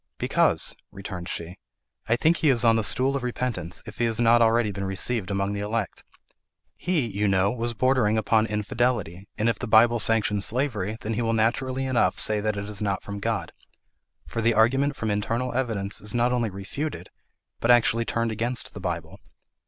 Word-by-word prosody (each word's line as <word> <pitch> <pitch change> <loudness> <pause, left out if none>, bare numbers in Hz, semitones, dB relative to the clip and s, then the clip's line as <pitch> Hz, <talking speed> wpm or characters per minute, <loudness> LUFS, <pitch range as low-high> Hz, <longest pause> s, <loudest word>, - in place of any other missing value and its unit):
"Because," - - +1 0.2
returned 95 -2 -7
she, 85 +3 -5 0.5
"I 115 - +4
think 160 +7 +2
he 155 - +2
is 120 -3 +3
on 115 -1 +5
the 110 - +1
stool 130 +5 +2
of 140 - -1
repentance, 120 -8 -3
if - - -11
he 120 - +2
has 115 -1 0
not 120 0 +5
already 115 -1 +3
been 100 0 -5
received 95 +2 -1
among 100 0 -1
the 100 - -3
elect. 105 0 -3 0.7
He, 180 -4 0
you 105 -1 -1
know, 95 +1 +2
was 120 -1 -3
bordering 125 -3 +2
upon 110 +1 +2
infidelity, 105 -3 -1
and 110 +1 +1
if 115 -3 0
the 125 - -4
Bible 115 +2 +5
sanctions 105 -2 +1
slavery, 110 -4 -2
then 110 - -3
he 120 - -1
will 115 -1 0
naturally 130 +4 0
enough 130 -2 +1
say 105 -1 +1
that 105 -1 -1
it 100 0 -4
is 105 0 -5
not 100 -2 -1
from 100 0 -6
God; - - -2 0.7
for 115 - -4
the 115 +1 +2
argument 135 +6 +3
from 110 -2 -2
internal 115 +5 -1
evidence 110 -6 -2
is 105 +2 -5
not 120 +1 +2
only 120 -3 0
refuted, 100 +11 -6 0.5
but 115 - -1
actually 115 -1 +4
turned 115 0 -1
against 120 +3 0
the - - -8
Bible. 85 -3 -5
115 Hz, 190 wpm, -25 LUFS, 100-120 Hz, 0.7 s, on